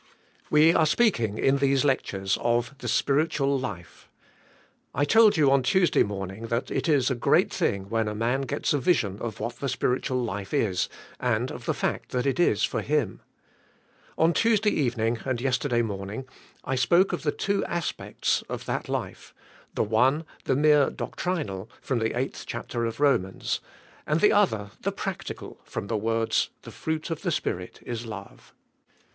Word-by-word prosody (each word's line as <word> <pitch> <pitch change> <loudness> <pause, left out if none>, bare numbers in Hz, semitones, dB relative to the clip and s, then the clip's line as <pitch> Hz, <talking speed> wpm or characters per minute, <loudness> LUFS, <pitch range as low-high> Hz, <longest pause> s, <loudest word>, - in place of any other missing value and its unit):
We 155 +2 +6
are 160 -2 +4
speaking", 120 - +2
in 135 +1 +3
these 140 0 +2
lectures, 95 -8 0
of 120 +2 0
the - - -6
spirit 145 +4 +2
ual 140 -1 +1
life. 90 -9 -7 0.9
I 145 - +2
told 220 +6 +6
jou 145 -4 +4
on 135 -1 +4
Tuesday 180 +7 +3
morning 100 +2 -3
that 115 +3 -2
it - - -1
is 140 -3 +3
a - - +3
great 120 - +2
thing 95 -1 -1
when 115 +1 0
a 105 - -3
man 125 +5 0
g 145 - -2
ets - - 0
a 145 - +2
vison 110 - +1
of 115 -3 -5
what 120 0 -4
the 140 - -2
spiritual 125 -1 0
life 100 +2 -4
is, 95 -9 +1 0.3
and - - 0
of - - -8
the - - +1
fact - - -2
that 125 0 0
it 135 +4 0
is 140 -12 +3
for - - 0
///;;/. 145 -9 0 1.0
On 165 +1 +4
Tuesday 220 0 +3
evening 120 - 0
and 130 -3 -1
yesterday 125 -1 +1
morning 100 +3 -5 0.4
I 135 - -2
spoke 170 +10 +3
of 175 - -2
the 150 - +1
two 200 +5 -1
aspects 170 -2 -1
of - - -5
that - - -3
life - - -5 0.2
— - - -27
the - - +2
one, 130 +9 +2 0.2
the - - +2
mere 150 0 +5
doctrinal, 115 - -4
from 130 -3 -1
the 110 +1 -1
eighth 130 +2 -3
chapter 120 -1 -3
of 115 +2 -4
Ro 145 -1 +5
mans; 95 +1 -4 0.5
and 155 +2 +2
the 210 - +5
other, 110 - +2
the - - -1
practical, - - -6
from - - -5
the 110 +2 -2
words, 115 +1 +1
"The - - -10
fruit 160 +1 -3
of 160 - -3
the - - -1
Spirit 90 - -3
is 120 -1 -5
love." 100 -3 -10
130 Hz, 180 wpm, -26 LUFS, 110-150 Hz, 1.0 s, We